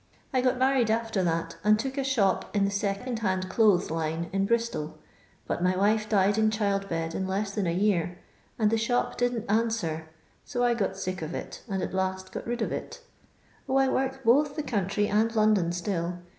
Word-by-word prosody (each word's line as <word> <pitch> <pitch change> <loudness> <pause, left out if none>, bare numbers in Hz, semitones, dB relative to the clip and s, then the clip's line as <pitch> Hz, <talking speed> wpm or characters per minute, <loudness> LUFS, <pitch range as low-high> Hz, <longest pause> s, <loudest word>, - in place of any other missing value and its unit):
I 255 - +3
got 255 0 +2
married 260 -3 +3
after 225 -2 0
that, 165 -1 -1
and 215 +1 +5
took 265 +4 -3
a 275 - -1
shop 230 -7 +1
in 200 -1 +3
the 200 - 0
second 200 +4 -2
hand 185 -3 -1
clothes 205 -6 +3
line 160 +1 -2
in 195 0 +1
Bristol, 230 -10 -1 0.5
but - - -2
my 180 +1 +2
wife 215 +3 +2
died 205 0 +3
in 220 0 +4
child 200 -2 -1
bed 165 -1 -2
in 190 +2 -2
less 200 +1 -2
than 200 -4 -1
a - - +1
year, 180 -2 +1 0.4
and 215 -2 +2
the 225 - +2
shop 245 +2 0
didn't 245 -2 -1
answer; 205 -8 0 0.4
so 245 -3 -2
I 240 -1 +4
got 195 -4 -1
sick 185 -2 -4
of 160 +1 -4
it, - - -6
and 190 -2 -1
at - - -4
last 190 0 -2
got - - -6
rid 240 -1 -1
of - - -2
it - - -6 0.7
0, 265 - +2
I 270 -1 +4
work 265 0 -1
both 285 +5 +4
the 305 - -2
country 205 -4 0
and 220 +3 +1
London 215 -5 +3
still. 175 -1 -2
205 Hz, 205 wpm, -27 LUFS, 185-230 Hz, 0.7 s, and